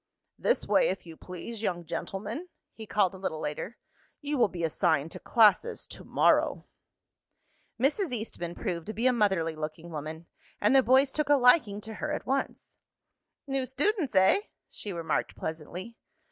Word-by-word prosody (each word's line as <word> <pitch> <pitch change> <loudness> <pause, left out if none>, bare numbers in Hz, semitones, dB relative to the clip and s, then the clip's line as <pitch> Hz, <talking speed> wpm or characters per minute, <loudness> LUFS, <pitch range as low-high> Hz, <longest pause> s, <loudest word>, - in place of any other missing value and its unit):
"This - - +1
way, - - +4
if - - -4
you 165 -1 -10
please, 185 +7 -7
young 175 -5 -2
gentlemen," 210 - -5 0.2
he 220 -1 -10
called 200 -4 +2
a 190 - -10
little 160 -4 -3
later. 155 +9 -4 0.4
"You 295 0 -2
will 235 - +5
be 175 -3 -6
assigned 160 -2 +1
to - - -7
classes 230 - +3
to - - -8
morrow." - - +2 1.1
Mrs. 300 - +1
Eastman 210 -7 -5
proved 170 -2 -4
to 215 - -4
be 230 +3 -2
a 255 - +5
motherly 190 -8 +1
looking 155 +2 -6
woman, 155 +2 -6 0.3
and 210 +6 +3
the 265 - +8
boys 260 +2 +4
took 300 0 -1
a 290 - +7
liking 250 -6 +4
to 220 +1 -8
her 300 - -1
at 300 - -3
once. 270 +1 -3 0.7
"New 270 -2 -1
students, 285 - 0
eh?" 190 - +6 0.3
she 205 - -5
remarked 165 -3 -2
pleasantly. 170 +8 -6
210 Hz, 165 wpm, -29 LUFS, 170-265 Hz, 1.1 s, the